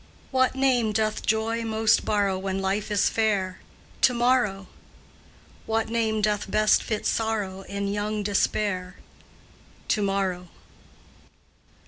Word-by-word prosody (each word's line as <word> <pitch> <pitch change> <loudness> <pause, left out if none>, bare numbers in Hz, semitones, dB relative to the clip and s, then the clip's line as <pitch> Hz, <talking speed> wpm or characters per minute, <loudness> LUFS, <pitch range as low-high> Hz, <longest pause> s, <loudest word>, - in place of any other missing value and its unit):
What 260 -1 +2
name 250 -5 +2
doth 215 0 -1
Joy 225 +1 0
most 220 -1 +2
borrow 200 -2 +1
When 190 0 -3
life 195 +2 -1
is 205 -2 +2
fair? 200 -4 0 0.4
"To 250 - +4
morrow." 235 -5 +1 1.0
What 225 0 0
name 220 -2 0
doth 210 -1 0
best 215 +2 +3
fit 215 -2 -3
Sorrow 210 -4 -1
In 200 0 -3
young 205 +1 -2
despair? 200 -2 -1 0.9
"To 215 - +2
morrow." 195 -3 -1
210 Hz, 115 wpm, -25 LUFS, 195-225 Hz, 1.0 s, To